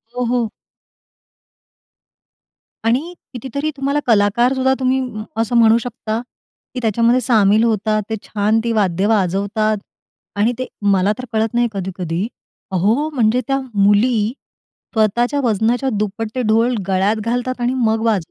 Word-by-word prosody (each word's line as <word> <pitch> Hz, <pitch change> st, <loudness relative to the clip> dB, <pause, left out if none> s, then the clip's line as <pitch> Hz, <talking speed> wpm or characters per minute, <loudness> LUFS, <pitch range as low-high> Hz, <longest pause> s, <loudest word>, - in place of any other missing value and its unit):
हो, 250 Hz, -, -1 dB
हो. 235 Hz, -2 st, 0 dB, 2.4 s
आणि 270 Hz, +10 st, 0 dB, 0.2 s
कितीतरी 270 Hz, +5 st, -3 dB
तुम्हाला 280 Hz, +2 st, 0 dB
कलाकारसुद्धा 240 Hz, +5 st, +3 dB
तुम्ही 260 Hz, 0 st, +1 dB, 0.4 s
असं 230 Hz, +2 st, -1 dB
म्हणू 225 Hz, 0 st, +6 dB
शकता, 225 Hz, -2 st, -4 dB, 0.5 s
की 255 Hz, -, -3 dB
त्याच्यामध्ये 235 Hz, +3 st, +2 dB
सामील 215 Hz, -2 st, +3 dB
होतात. 215 Hz, -1 st, +1 dB
ते 220 Hz, -, -1 dB
छान 215 Hz, +1 st, +1 dB
ती 235 Hz, -, -1 dB
वाद्य 195 Hz, -3 st, +1 dB
वाजवतात 210 Hz, +1 st, +1 dB, 0.6 s
आणि 215 Hz, +4 st, +3 dB
ते 255 Hz, -, -3 dB, 0.2 s
मला 195 Hz, +1 st, +3 dB
तर 255 Hz, -, -6 dB
कळत 220 Hz, +1 st, 0 dB
नाही 240 Hz, 0 st, +2 dB
कधी-कधी. 185 Hz, 0 st, -3 dB, 0.4 s
अहो, 215 Hz, -, +1 dB
म्हणजे 250 Hz, -4 st, +1 dB
त्या 270 Hz, 0 st, +1 dB
मुली 205 Hz, +2 st, +3 dB, 0.7 s
स्वतःच्या 235 Hz, +6 st, +1 dB
वजनाच्या 235 Hz, +4 st, +1 dB
दुप्पट 215 Hz, +2 st, -2 dB
ते 255 Hz, -, 0 dB
ढोल 230 Hz, +3 st, +3 dB
गळ्यात 195 Hz, +3 st, +2 dB
घालतात 245 Hz, +1 st, -2 dB
आणि 245 Hz, +2 st, +1 dB
मग 225 Hz, -3 st, +1 dB
वाजव 200 Hz, -7 st, 0 dB
225 Hz, 130 wpm, -18 LUFS, 205-245 Hz, 2.4 s, म्हणू